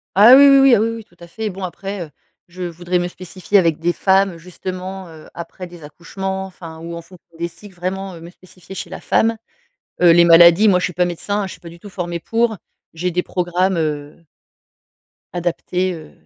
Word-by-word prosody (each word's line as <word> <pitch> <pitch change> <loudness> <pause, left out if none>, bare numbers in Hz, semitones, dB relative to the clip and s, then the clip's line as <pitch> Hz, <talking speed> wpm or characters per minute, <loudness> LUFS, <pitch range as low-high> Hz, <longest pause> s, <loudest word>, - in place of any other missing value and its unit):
Ah 215 +6 +9
oui, 280 +1 +8
oui, 275 - +7
oui 270 -2 +6
ah 210 - +2
oui 225 - +1
oui, 230 -1 -7
tout 175 - -28
à 170 - -11
fait. 220 +4 -4
Bon 190 0 -8
après, 195 +2 -5
heu, - - -16 0.4
je 180 +1 -8
voudrais 175 +1 -2
me 175 - -1
spécifier 185 +2 -2
avec 165 -5 +2
des 175 +1 0
femmes, 195 +1 +2
heu, 170 - -11
justement, 185 +2 -7
heu, 160 -2 -14
après 170 +2 -8
des 175 -2 -14
accouchements. 190 +5 -5
Enfin, 165 -4 -11
ou 170 +1 -7
en - - -7
fonction 175 +1 -18
des 170 - -1
cycles, 175 +3 -15
vraiment, 185 +1 -4
heu, - - -11
me 165 +1 -11
spécifier 185 0 -15
chez - - -6
la - - -7
femme. 225 0 +1 0.6
Heu, 175 -1 +7
les 170 +1 +6
maladies, 170 +4 +7
moi, 185 -3 +4
je - - -1
suis 180 - -4
pas 180 +2 +1
médecin, 200 +4 -3
hein, - - -2
je 190 - -7
suis - - -11
pas 170 - -10
du 170 +1 -14
tout 205 +3 -12
formée 175 -2 -4
pour. 225 +4 0 0.4
J'ai 180 +2 -2
des 180 +1 0
programmes, 180 +1 -1
heu 150 0 -4 1.1
adaptés, 180 +1 -2
heu, 160 -2 -11
180 Hz, 225 wpm, -19 LUFS, 170-195 Hz, 1.1 s, Ah